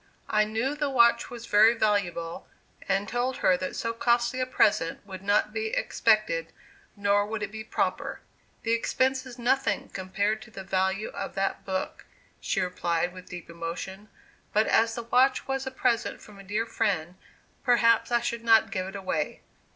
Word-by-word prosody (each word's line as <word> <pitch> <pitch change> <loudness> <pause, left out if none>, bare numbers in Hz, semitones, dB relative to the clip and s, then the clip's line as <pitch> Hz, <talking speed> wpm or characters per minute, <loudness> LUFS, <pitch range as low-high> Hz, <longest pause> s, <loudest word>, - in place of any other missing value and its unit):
I 215 0 +4
knew 225 +6 -1
the 295 -1 -1
watch 235 -3 +4
was 240 -1 -8
very 220 +1 +6
valuable, 180 -7 -1 0.4
and 195 +1 +1
told 245 +2 -1
her 185 - +6
that 185 +1 -4
so 230 0 -2
costly 240 +2 +1
a 255 - 0
present 200 -8 +1
would 190 -2 -8
not 205 +1 +1
be 220 0 -1
expected, - - +1 0.4
nor 205 0 +2
would 215 0 -3
it 205 - -4
be 220 0 -6
proper. - - -2 0.4
"The 230 - 0
expense 260 +3 +1
is 250 -1 -10
nothing, 255 +3 0
compared 200 +3 -1
to 215 - -12
the 195 -3 -8
value 190 +2 0
of 195 - -6
that 195 0 -1
book," 190 -1 -4 0.3
she - - -1
replied, 175 -1 -1
with 185 0 -12
deep 175 -1 -8
emotion; 170 +5 -6 0.4
"but 215 +1 +4
as 225 0 +3
the 235 - -4
watch 250 +3 +3
was 270 0 -2
a - - -3
present 245 -3 0
from 210 -2 -14
a - - -10
dear 210 +4 -1
friend, 185 -8 -1 0.5
perhaps 240 -2 +4
I 240 0 +3
should 235 0 -3
not 225 -1 +5
give 185 -2 -2
it 195 - -8
away." 185 -6 -2
215 Hz, 175 wpm, -27 LUFS, 190-235 Hz, 0.5 s, very